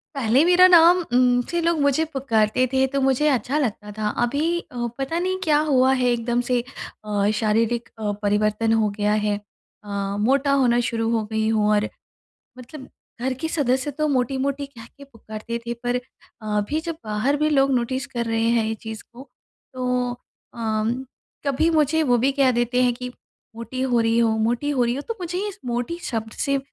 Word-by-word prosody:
पहले 260 +1 +3
मेरा 360 +1 +7
नाम 345 0 +7 0.2
उम, 245 0 +4
से 345 - -1
लोग 335 -1 +1
मुझे 285 +3 +2
पुकारते 255 -5 +1
थे 265 0 +3
तो 275 +1 -2
मुझे 270 +3 +2
अच्छा 265 +1 0
लगता 210 -6 -3
था। 210 0 -3 0.2
अभी 305 +8 0
अ, 240 -7 -5
पता 275 +5 -2
नहीं 370 +1 -1
क्या 300 -4 +3
हुआ 260 -1 +4
है 255 -1 0
एकदम 240 0 0
से 250 - +3 0.5
अ, 205 -1 +1
शारीरिक 225 +2 0
अ, 210 -1 -1
परिवर्तन 215 +2 +1
हो 220 -2 +2
गया 210 0 +1
है 210 -1 +1 0.5
अ, 205 - -12 0.3
मोटा 270 +6 +2
होना 250 -4 +3
शुरू 225 -1 -1
हो 225 - 0
गई 220 0 0
हूँ। 215 -1 +2
और 210 0 +2 0.7
मतलब 260 +2 -10 0.3
घर 260 +1 0
के 320 - -1
सदस्य 265 -2 0
तो 305 +2 -1
मोटी-मोटी 275 +1 -1
कह 235 -5 -13
के 280 - -12
पुकारते 230 -3 -7
थे, 235 - -2
पर 245 +1 -2 0.4
अभी 210 +7 -1
जब 330 -1 -5
बाहर 215 +7 0
भी 305 +1 +1
लोग 275 -2 +3
नोटिस 260 +3 -1
कर 240 -3 -3
रहे 225 0 -1
हैं 235 -1 +2
ये 220 0 -2
चीज़ 220 0 -8
को, 260 +4 -12 0.4
तो 250 -1 -1 0.4
अ, 220 -2 -1 0.6
कभी 300 +4 +2
मुझे 315 0 +2
वो 245 -4 +3
भी 265 +4 +2
कह 270 -2 +3
देते 240 +1 +1
हैं 245 -1 +2
कि, 250 +1 -6 0.5
"मोटी 235 +3 -6
हो 250 -2 +2
रही 225 0 +2
हो, 230 -1 +3
मोटी 235 +6 0
हो 265 -4 +1
रही 240 +1 0
हो।" 280 - -4
तो 460 - -3
मुझे 360 +3 -3
इस 400 -1 -8
मोटी 245 +7 -2
शब्द 225 -2 -4
से 275 0 +1
250 Hz, 190 wpm, -23 LUFS, 225-280 Hz, 0.7 s, मेरा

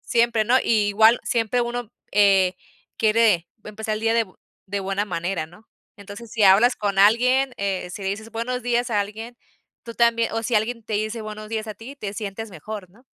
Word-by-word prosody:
Siempre, 235 -2 +1
¿no?, 245 +4 +4
y 215 -3 +2
igual, 220 +3 +5
siempre 235 +1 0
uno, 240 -1 -3 0.2
eh, 195 -2 +4 0.4
quiere 215 -6 +3 0.2
empezar 215 +1 -4
el 215 - -5
día 225 +1 +1
de 230 -1 +3
bu 185 - -22 0.3
de 200 +1 -3
buena 195 +1 -1
manera, 175 -3 -3
¿no? 190 +7 -19 0.3
Entonces, 205 +3 -11
si 225 -2 -1
hablas 205 +6 +6
con 200 -2 -2
alguien, 250 +6 +4
eh, 195 -2 -2
si 200 - -7
le 190 - -2
dices 220 +3 -5
buenos 250 +3 -3
días 245 +1 0
a 210 -2 +2
alguien, 220 +4 -6 0.5
tú 230 -1 -8
también 235 -1 +2
o 225 0 -2
si 235 +1 -2
alguien 230 +2 -1
te 215 -1 -5
dice 215 +2 -2
buenos 215 0 -8
días 220 0 -3
a 215 - -5
ti, 235 +7 -10
te 205 -7 -5
sientes 210 +1 -6
mejor, 195 +2 -8
¿no? 225 +7 -23
215 Hz, 205 wpm, -23 LUFS, 200-230 Hz, 0.5 s, hablas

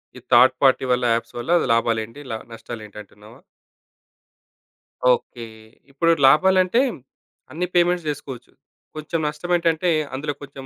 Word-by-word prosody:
ఈ - - -10
third 125 +2 +6
party 130 0 +3
వల్ల 125 0 +1
apps 115 0 -4
వల్ల 125 +8 -4 0.2
లాభాలేంటి? 115 +2 -1
లా 110 - -3 0.2
నష్టాలేంటి 110 -2 -10
అంటున్నావా? 105 +5 -17 1.7
ఓకే. 120 - -6 0.5
ఇప్పుడు 165 +5 +1 0.2
లాభాలంటే 185 - +4 0.7
అన్నీ 180 +3 -3
పేమెంట్స్ 175 -1 +2
జేసుకోవచ్చు. 135 -4 -7 0.4
కొంచెం 155 +2 -4
నష్టం 150 +4 -5
ఏంటంటే 170 +1 0 0.2
అందులో 145 +2 -3
కొంచెం 135 -1 -10
140 Hz, 120 wpm, -21 LUFS, 115-170 Hz, 1.7 s, third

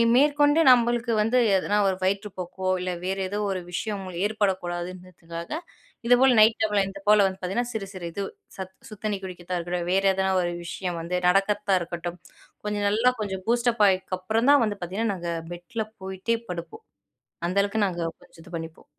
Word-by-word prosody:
மேற்கொண்டு 290 +2 +4
நம்மளுக்கு 240 -1 +3
வந்து 225 +4 +2 0.2
எதனா 195 +2 +1
ஒரு 190 - +1
வயிற்று 200 +2 0
போக்கோ, 185 +1 -3
இல்ல 180 0 -2
வேற 190 +1 -1
ஏதோ 205 - -3
ஒரு 185 - -1
விஷயம் 205 +2 -2 0.2
ஏற்படக்கூடாதுன்றதுக்காக 180 - -3 0.5
இதுபோல 250 +1 +6
நைட் 220 +1 +6
டைம்ல 210 -2 +2
இது 195 0 -10
போல 210 -1 +7
வந்து 190 0 -5
பார்த்திங்கன்னா, 215 +7 -2
சிறு 200 -3 -3
சிறு 180 -2 -7
இது 200 +4 -3 0.3
சத் 190 0 -6 0.2
சுடுதண்ணி 210 -1 -3
குடிக்கிறதா 180 -1 -5
இருக்கட்டும், 175 0 -3
வேற 195 +1 +3
எதனா 190 0 +1
ஒரு 175 0 -1
விஷயம் 175 0 -4
வந்து 180 +2 -2
நடக்கிறதா 200 +1 +3
இருக்கட்டும், 175 +1 -5 0.5
கொஞ்சம் 205 -1 -1
நல்லா 225 +5 +3
கொஞ்சம் 190 -2 -4
பூஸ்டப் 235 -2 +2
ஆயினதுகப்புறம் 190 +6 +1
தா - - +8
வந்து 205 -1 -3
பார்த்திங்கன்னா 200 +5 -1
நாங்க 170 -1 -4 0.2
பெட்ல 175 +6 -4 0.2
போய்ட்டே 190 +5 -1
படுப்போம். 180 - -7 0.6
அந்த 185 +3 -2
அளவுக்கு 205 +1 +1
நாங்க 175 -2 -4 0.2
கொஞ்சம் 165 - -17
இது 170 0 -8
பண்ணிப்போம். 165 0 -9
195 Hz, 165 wpm, -26 LUFS, 180-220 Hz, 0.6 s, தா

